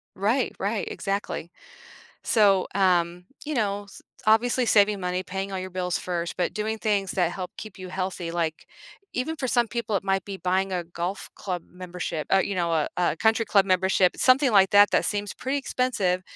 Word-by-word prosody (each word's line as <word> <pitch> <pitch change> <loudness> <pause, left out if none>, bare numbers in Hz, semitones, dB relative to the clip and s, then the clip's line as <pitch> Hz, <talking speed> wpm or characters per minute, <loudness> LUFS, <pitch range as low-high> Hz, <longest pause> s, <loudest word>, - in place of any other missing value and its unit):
Right, 225 +7 0
right, 205 +2 -1
exactly. 195 -4 -3 0.7
So, 200 -4 +4
um, 180 -2 +2 0.2
you 305 +1 -3
know, 205 -4 -1
s 200 - -15 0.2
obviously, 240 +3 +3
saving 205 -2 +4
money, 180 0 -2
paying 195 +1 -5
all 190 - -2
your 185 0 -5
bills 180 -1 -2
first, 175 -2 -3
but 180 - -1
doing 220 +1 -2
things 205 -3 0
that 175 -3 +1
help 185 -1 -5
keep 215 -3 -9
you 185 -1 -7
healthy, 185 -2 -3
like 165 -2 -2 0.5
even 270 +6 -2
for 265 -4 -3
some 240 -1 +3
people, 230 -2 -2
it 195 - -3
might 195 -1 0
be 200 -1 -6
buying 190 +1 0
a 180 -1 -2
golf 175 +3 -5
club 180 -3 -4
membership 180 -3 -5
uh, 195 - +6
you 200 +1 -1
know, 170 -2 0
a 160 -2 +1
a 175 -2 +1
country 225 +4 +2
club 200 -3 +4
membership, 185 -1 +2
something 260 +1 +4
like 195 -2 +5
that, 205 0 +6
that - - +2
seems 205 -1 -2
pretty 265 +2 -2
expensive. 225 -10 0
195 Hz, 190 wpm, -25 LUFS, 180-215 Hz, 0.7 s, uh